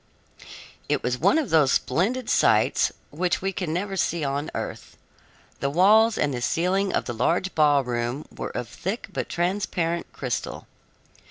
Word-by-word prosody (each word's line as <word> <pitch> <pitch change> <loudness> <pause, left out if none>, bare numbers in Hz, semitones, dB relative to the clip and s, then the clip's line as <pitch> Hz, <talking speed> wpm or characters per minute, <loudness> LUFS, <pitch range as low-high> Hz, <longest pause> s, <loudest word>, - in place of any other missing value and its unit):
It - - 0
was 125 0 -1
one 195 - +4
of 310 -5 -1
those 150 -5 +4
splendid 240 +8 0
sights - - +3 0.2
which 175 +4 0
we 195 +1 -2
can 180 -4 -3
never 195 +4 -2
see 170 -3 0
on 140 +2 -2
earth. - - -6 0.6
The 140 - 0
walls 215 +8 +5
and 145 -1 0
the 120 - -3
ceiling 185 +8 +1
of - - -1
the 120 - -4
large 170 +11 0
ballroom 135 -3 +1
were - - -4
of 120 - -5
thick 195 - -5
but - - -3
transparent 175 -2 -1
crystal. 125 -3 -4
170 Hz, 155 wpm, -25 LUFS, 140-195 Hz, 0.6 s, walls